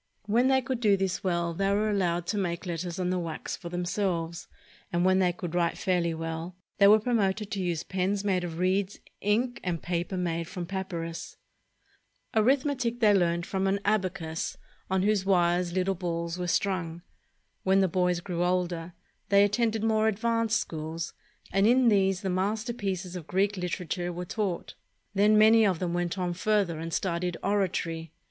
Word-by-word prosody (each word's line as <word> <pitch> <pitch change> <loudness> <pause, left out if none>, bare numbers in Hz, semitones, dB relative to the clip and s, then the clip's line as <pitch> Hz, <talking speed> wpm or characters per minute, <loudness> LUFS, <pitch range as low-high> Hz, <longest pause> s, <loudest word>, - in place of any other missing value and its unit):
When 235 +5 +3
they 265 -1 +3
could 255 -1 -2
do 210 -4 +4
this 190 -1 -2
well, 170 -2 0
they 195 +3 0
were 205 +2 +2
allowed 175 -4 0
to 210 - -2
make 170 -2 -2
letters 175 0 -4
on 180 0 0
the 185 - 0
wax 165 -2 -4
for 170 - -8
themselves; 175 -2 -2 0.4
and 175 +1 +1
when 185 0 +4
they 180 -2 +3
could 175 -1 -6
write 170 -1 +1
fairly 175 -3 0
well, 165 +2 -5 0.2
they 200 - +8
were 210 +2 +8
promoted 210 -3 0
to 195 - -2
use 175 -2 -1
pens 195 +2 -1
made 190 -3 +1
of 165 -2 -5
reeds, 190 +2 0 0.2
ink, 235 +5 +1
and 175 -3 -2
paper 175 +2 -2
made 170 -2 -2
from 180 0 -5
papynis. 170 -3 -5 1.0
Arithmetic 255 +1 +2
they 215 -3 +5
learned 170 -2 +2
from 190 0 -1
an 195 +1 +1
abacus, 185 -6 -1 0.3
on 190 0 +1
whose 205 -1 +2
wires 175 -2 +2
little 185 +1 +1
balls 170 -2 -3
were 180 - -2
strung. 175 -2 -1 0.6
When 190 +1 +3
the 190 - +4
boys 180 -1 +1
grew 175 -1 -2
older, 175 -1 -1 0.4
they 200 0 +6
attended 220 +1 +1
more 220 -1 +3
advanced 230 +1 +1
schools, 160 +1 -5 0.4
and 195 +2 +3
in 245 0 +5
these 195 -2 +2
the 195 - -2
masterpieces 195 -1 -2
of 170 -4 -7
Greek 195 +3 +1
literature 180 -1 -3
were 175 +1 -5
taught. 190 -3 -3 0.4
Then 210 +2 +4
many 220 +1 +7
of 190 -5 +2
them 175 0 -2
went 175 +1 -1
on 180 -1 -1
further 190 -3 +1
and 165 +1 -5
studied 175 0 -1
oratory. 175 -5 -1
185 Hz, 175 wpm, -28 LUFS, 175-205 Hz, 1.0 s, they